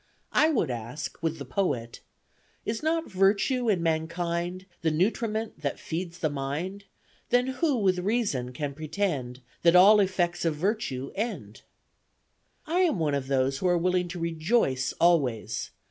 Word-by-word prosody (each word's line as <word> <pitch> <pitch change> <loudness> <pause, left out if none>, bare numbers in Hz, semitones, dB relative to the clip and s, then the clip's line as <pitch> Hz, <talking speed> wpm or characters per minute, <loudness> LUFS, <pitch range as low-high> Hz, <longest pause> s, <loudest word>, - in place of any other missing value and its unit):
I 310 - +5
would 255 - +1
ask 120 +8 -6
with 160 0 -1
the 140 - -7
poet, 125 -7 -2 0.7
Is 220 +1 -2
not 320 -1 -1
virtue 200 +6 +2
in 185 -5 +2
mankind 170 +2 -1 0.2
The 165 - +2
nutriment 215 +5 -1
that 140 -2 -2
feeds 170 +1 -5
the 155 - 0
mind, 155 +9 -4 0.4
Then 245 0 +3 0.2
who, 300 -6 +3
with 190 -4 +2
reason, 190 - 0
can 140 +2 -4
pretend 145 -5 -3 0.2
That 170 +1 +5
all 200 +4 +8
effects 185 -3 +1
of 165 -2 +1
virtue 150 - -2
end? 225 +4 -4 1.0
I 335 +4 0
am 345 - +3
one 155 -3 0
of 140 -2 -1
those 135 0 +1
who 185 - 0
are 175 -1 +3
willing 180 +1 +1
to 175 0 -6
rejoice 165 - +1
always. 130 -11 +1
175 Hz, 150 wpm, -27 LUFS, 145-200 Hz, 1.0 s, all